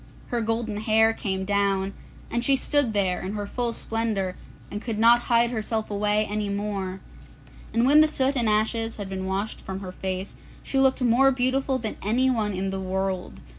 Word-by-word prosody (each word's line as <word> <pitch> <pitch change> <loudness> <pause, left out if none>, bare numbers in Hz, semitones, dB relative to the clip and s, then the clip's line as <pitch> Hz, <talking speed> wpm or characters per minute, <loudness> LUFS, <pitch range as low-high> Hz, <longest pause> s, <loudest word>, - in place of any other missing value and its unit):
Her 240 -1 0
golden 225 -1 -2
hair 220 +1 +3
came 190 -3 -3
down, 200 -1 +1 0.4
and 235 0 0
she 275 +2 +4
stood 285 -2 +1
there 190 -3 +1
in 190 +2 -4
her 205 -1 -3
full 240 +3 -2
splendour, 220 -5 -2 0.4
and 205 - -4
could 225 -3 -3
not 235 +2 +5
hide 235 0 +4
herself 220 -1 -2
away 210 +1 +1
any 210 0 -2
more. 200 -2 -3 0.7
And 230 +1 +2
when 295 +3 +7
the 310 - +6
soot 275 -2 0
and 235 -4 +1
ashes 225 +2 0
had 200 -2 -6
been 190 -1 -4
washed 195 +3 -3
from 190 0 -6
her 185 -2 -6
face, 185 +1 -5 0.3
she 270 - 0
looked 265 -1 +3
more 250 +3 +5
beautiful 265 +1 +1
than 220 -4 -4
anyone 225 -1 +1
in 190 +1 -2
the 195 - -3
world. 190 0 -3
215 Hz, 185 wpm, -25 LUFS, 195-240 Hz, 0.7 s, when